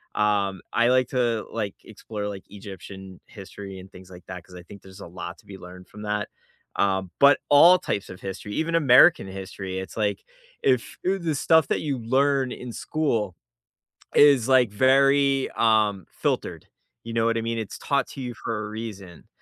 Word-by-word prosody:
um, 100 -3 0
I 120 +1 +3
like 130 -1 +3
to, 120 -4 0
like, 105 -4 -3
explore, 105 -1 -7
like, 100 -2 -7
Egyptian 95 -2 -11
history 100 -2 -10
and 95 +1 -12
things 95 -1 -14
like 90 -1 -13
that 90 -2 -8
'cause 90 - -16
I 90 - -10
think 100 +3 -14
there's 95 +1 -14
a - - -8
lot 90 +1 -8
to - - -22
be 95 - -10
learned 90 0 -12
from 105 - -12
that, 105 0 -2 0.5
um, 95 -2 0
but 140 +1 +6
all 170 +6 +7
types 100 - -3
of 90 - -11
history, 100 +2 -6
even 165 +1 -1
American 145 - +6
history, 95 0 -6
it's 95 +3 -8
like 105 -2 -1 0.4
if, 130 -2 +1
eh, 190 +2 +1
the 165 -4 -2
stuff 160 +2 +3
that - - +1
you 145 -4 -2
learn 135 +2 +1
in 125 -2 -7
school 115 - -2 0.8
is, 140 -5 +6
like, 125 -5 +4
very, 135 +3 +3
um, 105 -4 +2
filtered, - - -3 0.4
you 115 - -7
know 115 0 +1
what 115 0 +1
I - - -1
mean? 115 0 -3
It's 110 - -6
taught 140 -1 0
to 135 - -8
you 125 -1 -5
for 105 +2 -4
a - - -7
reason, 105 -6 -8
110 Hz, 190 wpm, -24 LUFS, 95-130 Hz, 0.8 s, all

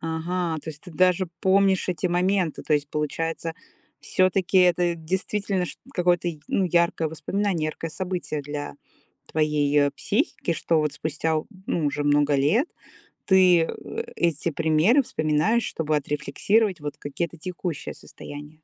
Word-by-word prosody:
Ага, 165 +1 -2
то 160 - -5
есть 150 -1 -13
ты 180 - -11
даже 185 +2 +3
помнишь 190 0 +3
эти 180 -1 0
моменты. 180 -1 +1
То - - -2
есть, 145 -1 -1
получается, 165 +2 -3 0.5
всё-таки 185 0 +2
это 175 -1 +4
действительно 190 +3 -2
шт - - -8
какое-то, 175 -1 +2 0.2
ну, 195 - +1
яркое 170 -2 +2
воспоминание, 165 +2 -1
яркое 160 +1 -5
событие 180 -3 -3
для 145 0 -5 0.6
твоей, 150 -2 +1
э, 145 0 +4
психики, - - -1
что 165 -2 +1
вот 150 -1 0
спустя, 155 +2 -1 0.3
ну, 160 -3 0
уже 145 0 -1
много 145 0 +3
лет 200 - +2 0.6
ты, 185 -3 +6
э, 440 - -5
эти 170 -1 0
примеры 160 - +3
вспоминаешь, 155 - +1
чтобы 155 -1 -1
отрефлексировать 175 +8 0
вот 145 0 -5
какие-то 170 +4 -4
текущие 175 -2 -5
состояния. 145 +1 -11
165 Hz, 140 wpm, -25 LUFS, 150-185 Hz, 0.6 s, ты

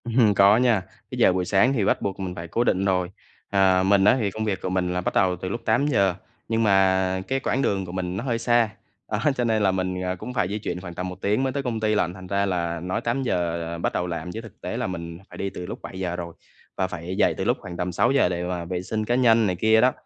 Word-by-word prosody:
Ừm. 115 -3 +3
Có 100 +2 +6
nha, 120 -5 +3 0.3
cái - - -5
giờ 95 - +5
buổi 90 0 -1
sáng 105 +9 +3
thì 110 -7 +1
bắt - - +1
buộc 100 -1 -3
mình 90 -2 -4
phải 85 0 -6
cố 115 +8 0
định 95 -4 +1
rồi, 90 -2 +1 0.4
ờ. 95 -2 +4
Mình 95 0 +4
á 125 - +6
thì 105 -4 0
công 110 +2 -3
việc 100 -3 -2
của 95 - -2
mình 90 -1 0
là 90 - -1
bắt - - -2
đầu 95 -3 +3
từ 90 +1 -5
lúc 115 +4 -4
8:00, 110 -6 +2 0.3
nhưng 115 0 +1
mà 95 -2 +3
cái 135 0 0
quãng 135 0 0
đường 95 -6 0
của 90 - -8
mình 90 0 -3
nó - - -3
hơi 120 -4 0
xa, 120 -1 +3 0.4
đó, 105 - 0 0.2
cho 125 - 0
nên 110 -3 +1
là 95 - +4
mình, 95 -1 -2
à, 90 0 -1
cũng 125 +7 -7
phải 105 -8 +1
di 105 +3 -3
chuyển 90 -3 -4
khoảng 90 -2 -8
tầm 90 +2 -4
1 90 +1 -10
tiếng 105 +6 +1
mới 130 -1 -1
tới 140 - -2
công 120 -4 -2
ty 110 0 +1
lận. 90 -4 +1
Thành 95 0 -10
ra 100 +1 +1
là 85 -3 -1
nói 90 +2 -3
8:00 115 -9 -1
là 85 0 -4
bắt 85 - -1
đầu 90 - -1
làm 90 +1 -4
chứ 110 - -6
thực 115 -2 -14
tế - - -4
là - - -1
mình 85 -2 -6
phải - - -11
đi 100 - -2
từ 90 - -7
lúc - - -7
7:00 90 -2 -4
rồi, 85 -1 -6 0.4
và 95 - +1
phải 90 +1 -6
dậy - - +3
từ - - -2
lúc - - +1
khoảng 90 -2 -8
tầm 90 +1 -2
6:00 120 +4 +3
để 90 0 -2
mà 90 -1 -3
vệ 90 +1 -3
sinh 110 +3 -3
cá 120 - +1
nhân 115 -3 +4
này 90 - 0
kia 110 +4 +4
đó, 125 +2 +5
95 Hz, 285 wpm, -24 LUFS, 90-110 Hz, 0.4 s, Có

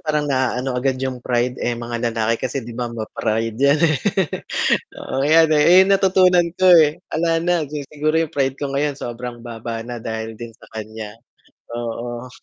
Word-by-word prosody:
parang 150 -3 -1
naaano 130 -1 0
agad 130 +1 0
yung 130 -1 -4
pride, 125 +1 -1
eh. 120 -1 -1
Mga 120 0 -3
lalaki 115 0 -1
kasi 135 -3 -4
'di 120 - -8
ba, 120 0 -3
ma-pride 110 0 -3
'yan, 140 +2 +4
eh. 155 -4 +2 1.0
Oo, 135 +1 -2
'yan, 160 +1 +5
eh. 150 - +4 0.2
Eh, - - +6
natutunan 185 -2 +4
ko, 185 0 +3
eh, 160 -3 +6
'ala 165 0 0
na. 175 -2 +1
Si 150 +1 -6
siguro 155 +2 0
yung 165 - -1
pride 135 -2 +1
ko 140 - -2
ngayon, 145 0 +1
sobrang 120 -2 -7
baba 115 -1 -6
na 120 +1 -6
dahil 110 0 -4
din 115 0 -8
sa - - -19
kanya, 110 0 -7 0.6
oo. 120 +1 -5
125 Hz, 180 wpm, -20 LUFS, 115-150 Hz, 1.0 s, Eh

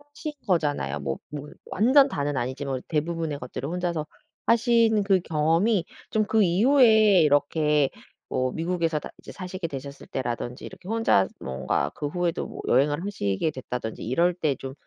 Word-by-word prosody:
하신 305 -1 -5
거잖아요. 145 - 0
뭐 70 -1 -3
뭐 150 -1 -7 0.2
완전 270 +7 +5
다는 145 - -2
아니지만 130 +1 -3
대부분의 160 -1 -2
것들을 125 +2 -6
혼자서 175 -3 -2 0.4
하신 230 -2 +4
그 195 -2 +3
경험이 165 +5 +1 0.2
좀 215 -1 +1
그 220 +1 +3
이후에 215 0 +5
이렇게 150 -1 +2 0.4
뭐 130 0 0
미국에서 165 0 -1
다 - - -8
이제 - - -11
사시게 185 -2 -5
되셨을 140 -1 -8
때라든지 120 -1 -4
이렇게 185 - -11
혼자 225 - +3
뭔가 65 +2 -2
그 145 - -4
후에도 175 +2 -2
뭐 - - -8
여행을 145 +6 +2
하시게 155 - -1
됐다든지 125 -4 -5
이럴 170 +10 +2
때 155 -6 0
좀, 135 0 -7
160 Hz, 340 characters per minute, -25 LUFS, 135-190 Hz, 0.4 s, 완전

